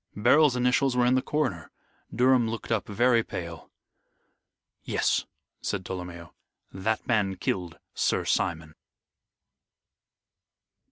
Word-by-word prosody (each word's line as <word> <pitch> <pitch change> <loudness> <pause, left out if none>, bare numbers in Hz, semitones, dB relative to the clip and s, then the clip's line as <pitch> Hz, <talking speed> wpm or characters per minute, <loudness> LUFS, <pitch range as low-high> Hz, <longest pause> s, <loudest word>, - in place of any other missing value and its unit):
Beryl's 130 +6 +4
initials 125 +1 +2
were 125 - +4
in 125 - +3
the 130 - +3
corner. 130 - -2 0.4
Durham 125 -1 +3
looked 115 +1 -6
up 110 -5 0
very 120 +3 +3
pale. 85 -4 -7 1.1
"Yes," - - 0 0.3
said 95 -3 -3
Tolomeo, 90 -2 -7 0.4
"that 110 +4 -2
man 105 -5 +1
killed 90 -2 -3 0.2
Sir - - 0
Simon." 80 -2 -1
110 Hz, 105 wpm, -27 LUFS, 90-125 Hz, 1.1 s, Beryl's